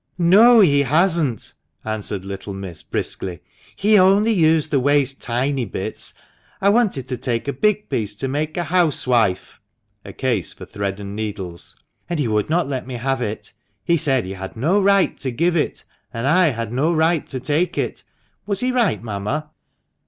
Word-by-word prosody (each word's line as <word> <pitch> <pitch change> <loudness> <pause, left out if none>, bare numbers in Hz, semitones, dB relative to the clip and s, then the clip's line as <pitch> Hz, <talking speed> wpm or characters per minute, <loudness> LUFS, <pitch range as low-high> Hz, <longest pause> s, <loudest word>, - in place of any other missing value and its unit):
<f - - -55
No, 215 +7 +6
he 145 -7 +4
hasn't! 155 - +1 0.2
" - - -38
answered 100 -2 -4
little 95 0 -6
miss, 95 -4 -7
briskly. 90 -4 -4 0.2
" - - -27
He 210 -1 +6
only 200 +4 +4
used 160 -5 +2
the 140 - +3
waste 140 0 +1
tiny 130 +3 -1
bits. 105 - -6 0.4
I 200 - +3
wanted 200 - +1
to 125 -1 -3
take 120 +1 -3
a 140 - -1
big 210 +8 0
piece 105 -2 -2
to 135 +6 -3
make 150 +4 -3
a 175 - 0
housewife" 130 - +1 0.4
(a - - -9
case 120 - -1
for - - -11
thread 100 -1 -4
and 100 0 -7
needles), 100 -5 -6 0.3
"and 175 - -1
he 140 - 0
would 105 +1 0
not 170 -1 +1
let 130 -2 -4
me 130 - -5
have 135 +2 -1
it. 110 -2 -5 0.3
He 170 - +2
said 135 - +1
he 95 - -5
had 95 +2 -8
no 170 - +2
right 200 -1 +3
to 135 - -2
give 170 +8 0
it, 155 - -1 0.3
and 115 +2 -4
I 175 +5 +4
had 115 -4 -3
no 145 +7 +1
right 160 -1 +1
to 130 - -4
take 150 +7 -1
it. - - -3 0.4
Was 200 -1 0
he 255 +1 +1
right, 240 - +1
mamma 120 +9 -4
140 Hz, 190 wpm, -20 LUFS, 110-170 Hz, 0.4 s, No